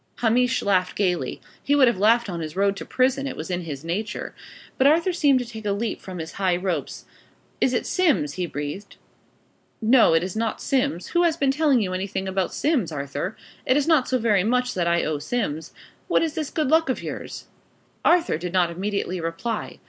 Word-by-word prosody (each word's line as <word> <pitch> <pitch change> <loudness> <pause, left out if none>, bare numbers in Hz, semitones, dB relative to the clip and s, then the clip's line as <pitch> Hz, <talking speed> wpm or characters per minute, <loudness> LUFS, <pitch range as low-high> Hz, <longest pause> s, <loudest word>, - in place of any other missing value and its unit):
Hamish 245 +1 +2
laughed 185 -3 +1
gaily. 180 -9 -1 0.2
He 285 - +2
would 275 -3 +6
have 235 -6 +1
laughed 230 +3 +4
on 175 -3 -4
his 155 0 -6
road 200 +1 +2
to - - -6
prison: 265 +2 +1
it - - -5
was 160 +4 -5
in 180 0 -1
his 145 -1 -6
nature. 200 +7 -3 0.5
But 265 - +5
Arthur 335 +5 +3
seemed 290 -6 +4
to 250 - -2
take 225 -2 -9
a 205 -1 0
leap 220 +3 -3
from 185 -1 -8
his 160 -1 -6
high 190 -3 0
ropes. 180 -1 -3 0.6
"Is 260 - +3
it 245 - -1
Simms?" 300 - +1
he 180 -1 -3
breathed. 150 +7 -6 0.8
"No, 230 -6 +5
it 165 - +3
is 185 +1 -4
not 225 0 -1
Simms. 250 - -1
Who 345 - +2
has 335 -2 +2
been 275 -3 +2
telling 280 -5 +2
you 185 -2 -3
anything 190 +1 -3
about 190 -1 -1
Simms, 270 - 0
Arthur? 140 +6 -4 0.3
It 255 - +2
is 290 - +1
not 310 -6 +4
so 255 - +1
very 215 -5 +2
much 250 +3 +1
that 175 -2 -1
I 170 0 +2
owe 155 -2 -1
Simms. 160 -6 -3 0.4
What - - +2
is 320 -2 -1
this 305 -3 -3
good 305 -4 -1
luck 320 -1 +3
of 260 - -2
yours?" - - -6 0.6
Arthur 340 - +3
did 175 +1 -5
not 175 -2 +2
immediately 185 0 -3
reply. 165 +8 -4
210 Hz, 210 wpm, -24 LUFS, 175-260 Hz, 0.8 s, would